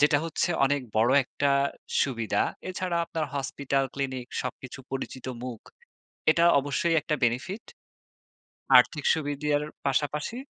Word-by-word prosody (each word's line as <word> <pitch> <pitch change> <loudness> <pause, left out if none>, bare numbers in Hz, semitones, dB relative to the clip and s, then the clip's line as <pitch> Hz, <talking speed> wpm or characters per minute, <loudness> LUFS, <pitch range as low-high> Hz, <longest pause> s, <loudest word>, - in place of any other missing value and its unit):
যেটা 145 0 +5
হচ্ছে 165 +2 -1
অনেক 145 +1 +2 0.2
বড় 115 +3 +4
একটা 140 +2 0 0.5
সুবিধা। 115 -5 0 0.3
এছাড়া 185 -1 -2
আপনার 160 -1 -3
হসপিটাল, 140 0 -1
ক্লিনিক 130 -3 -3 0.2
সবকিছু 130 +1 -7
পরিচিত 130 -1 -5 0.2
মুখ। 125 -3 -6 0.7
এটা 170 +2 +3
অবশ্যই 145 +4 0
একটা 155 -3 -1
বেনিফিট। 170 - -1 1.2
আর্থিক 150 -3 +2
সুবিধার 145 -1 -1 0.2
পাশাপাশি 150 - -1
140 Hz, 115 wpm, -27 LUFS, 130-155 Hz, 1.2 s, যেটা